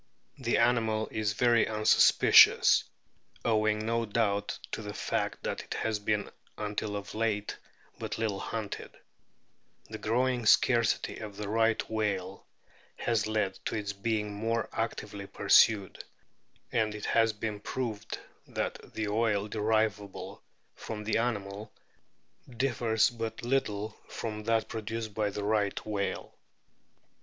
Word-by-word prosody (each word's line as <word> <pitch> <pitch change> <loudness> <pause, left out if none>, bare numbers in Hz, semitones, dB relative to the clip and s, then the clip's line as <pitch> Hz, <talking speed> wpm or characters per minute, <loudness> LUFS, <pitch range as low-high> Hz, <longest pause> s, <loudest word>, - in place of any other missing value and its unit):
The - - +1
animal 110 -3 +2
is 105 -1 -1
very 120 +1 +3
unsuspicious, 110 -1 +6 0.6
owing 110 -1 +2
no 115 +1 +1
doubt 105 -2 0
to - - -3
the 105 -1 -7
fact - - -2
that - - -2
it - - -6
has 110 -2 -1
been 105 0 -1 0.3
until 105 0 -3
of 100 -1 -6
late 105 -2 -1 0.4
but - - -4
little 110 -3 -1
hunted; 110 -1 -5 0.9
the - - -6
growing 120 +1 0
scarcity 115 -3 +3
of 105 -2 -8
the 105 -1 -4
Right 115 +1 +1
whale 100 -4 -2 0.5
has 115 -3 0
led 105 -3 -1
to - - -2
its 100 -2 -3
being 105 0 -2
more 115 +2 -1
actively 100 -1 -4
pursued, 100 -3 +4 0.7
and 110 -2 +1
it 105 - -6
has 115 -1 +3
been 105 -1 -4
proved 110 -2 -4 0.3
that - - -3 0.2
the 110 -1 -1
oil 105 -1 +1
derivable 110 -2 -1 0.3
from 105 -1 -6
the 110 +1 +1
animal 105 -2 -3 0.8
differs 120 -3 +1
but 115 -1 -5
little 110 -4 -1
from 105 -1 -5
that 115 -1 +1
produced 110 0 -4
by 105 0 0
the 100 +1 -5
Right 105 -1 +1
whale. 100 -2 -3
110 Hz, 130 wpm, -30 LUFS, 105-115 Hz, 0.9 s, unsuspicious